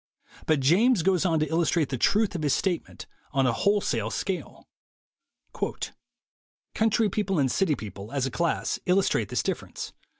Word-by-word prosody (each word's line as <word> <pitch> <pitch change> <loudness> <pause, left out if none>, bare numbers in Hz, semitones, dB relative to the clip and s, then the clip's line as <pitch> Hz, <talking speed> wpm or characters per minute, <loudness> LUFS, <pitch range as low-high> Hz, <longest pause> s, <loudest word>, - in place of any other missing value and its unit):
But 155 -3 +3
James 190 - +4
goes 185 0 +2
on 165 -2 +2
to 155 - +1
illustrate 165 -1 +1
the 130 - -2
truth 210 - +2
of 175 - -3
his 145 -3 +2
statement 180 -4 -3 0.3
on 135 -2 +2
a 125 - +2
whole 205 - +2
sale 110 - -1
scale: 185 - -4 2.1
"Country 220 0 +2
people 195 -2 -1
and 135 -4 +2
city 180 -7 +2
people, 100 -1 -8
as 140 -2 0
a 130 - -3
class, 170 +5 -1
illus 190 +2 +3
trate - - 0
this - - -1
difference. - - -4
170 Hz, 165 wpm, -26 LUFS, 135-195 Hz, 2.1 s, James